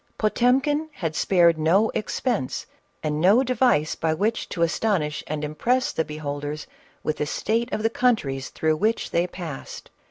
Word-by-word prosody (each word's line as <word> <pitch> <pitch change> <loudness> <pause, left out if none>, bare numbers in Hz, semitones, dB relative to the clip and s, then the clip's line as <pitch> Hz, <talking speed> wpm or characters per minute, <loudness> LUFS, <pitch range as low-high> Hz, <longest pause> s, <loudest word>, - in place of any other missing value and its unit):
Potemkin 265 +8 +2
had 165 - -3
spared 170 -4 +4
no 185 +8 +3
expense 215 - -2 0.4
and 150 0 -1
no 205 +9 +5
device 245 - +2
by 160 -1 0
which 210 +7 -1
to 170 - -1
astonish 170 -4 0
and 150 0 -3
impress 240 - 0
the 160 - 0
beholders 150 -1 -5 0.4
with 155 - -1
the 150 - -1
state 230 - -1
of 215 - -2
the 225 - +3
countries 150 - 0
through 155 -1 0
which 220 +6 0
they 170 +1 +1
passed. 170 -6 -8
175 Hz, 155 wpm, -24 LUFS, 155-230 Hz, 0.4 s, no